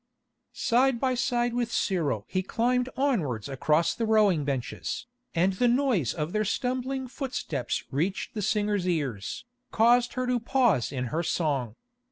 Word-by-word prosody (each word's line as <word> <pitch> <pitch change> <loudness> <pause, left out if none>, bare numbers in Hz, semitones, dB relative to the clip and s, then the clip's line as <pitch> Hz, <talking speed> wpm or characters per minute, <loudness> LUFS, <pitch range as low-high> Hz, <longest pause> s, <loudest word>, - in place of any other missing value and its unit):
Side 250 0 +2
by 260 0 +1
side 240 -1 0
with 240 -1 -1
Cyril 150 - 0
he 185 0 -1
climbed 250 +5 0
onwards 175 - 0
across 150 +4 +1
the 230 - -2
rowing 210 -8 +4
benches, 140 - -3 0.3
and 180 +3 +3
the 245 +6 +2
noise 240 - +2
of 155 +1 -3
their 215 0 +1
stumbling 255 +4 -2
footsteps 265 +1 -3
reaching 170 +8 -1
the 215 - -3
singer's 205 -2 0
ears, 140 - -2 0.3
caused 240 +2 +4
her 255 0 -1
to 250 -1 +1
pause 230 - +2
in 130 -2 -2
her 165 - +1
song. 140 -9 -1
215 Hz, 150 wpm, -27 LUFS, 155-245 Hz, 0.3 s, rowing